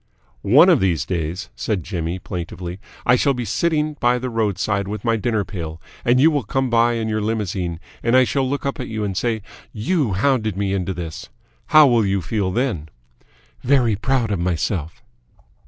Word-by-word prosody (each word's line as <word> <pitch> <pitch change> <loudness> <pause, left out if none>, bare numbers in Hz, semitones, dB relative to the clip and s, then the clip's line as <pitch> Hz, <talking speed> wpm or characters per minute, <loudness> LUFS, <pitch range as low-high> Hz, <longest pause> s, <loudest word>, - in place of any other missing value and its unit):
"One 135 - +6
of 175 -7 +5
these 90 -6 +1
days," 85 +2 -3
said 100 -6 -2
Jimmy 85 0 -3
plaintively, 90 0 -6 0.3
"I 125 - +5
shall 135 +2 +2
be 125 -1 -3
sitting 155 +2 0
by 120 +1 +3
the 125 0 -4
roadside 105 -2 0
with 105 +1 -5
my 115 -1 +3
dinner 110 -2 0
pail, 80 -4 -6 0.2
and 120 +1 +3
you 160 +4 +6
will 145 -2 +1
come 135 -2 -1
by 120 0 +4
in 115 -1 -2
your 110 0 -1
limousine, 95 -6 -2 0.2
and 120 +2 +3
I 130 - +7
shall 130 +1 0
look 140 0 -3
up 140 - -2
at 125 - -4
you 110 -1 -3
and 100 -2 -2
say 110 +1 -1 0.3
'You 120 - 0
hounded 110 -1 +1
me 100 -1 0
into 95 -1 -2
this!' 80 -2 -7 0.4
How 155 -1 +7
will 120 -4 +4
you 100 -1 +1
feel 95 +2 -1
then?" 95 - -2 0.7
"Very 125 -4 +3
proud 115 +1 0
of 100 - -1
myself." 85 -1 -2
110 Hz, 190 wpm, -21 LUFS, 95-125 Hz, 0.7 s, I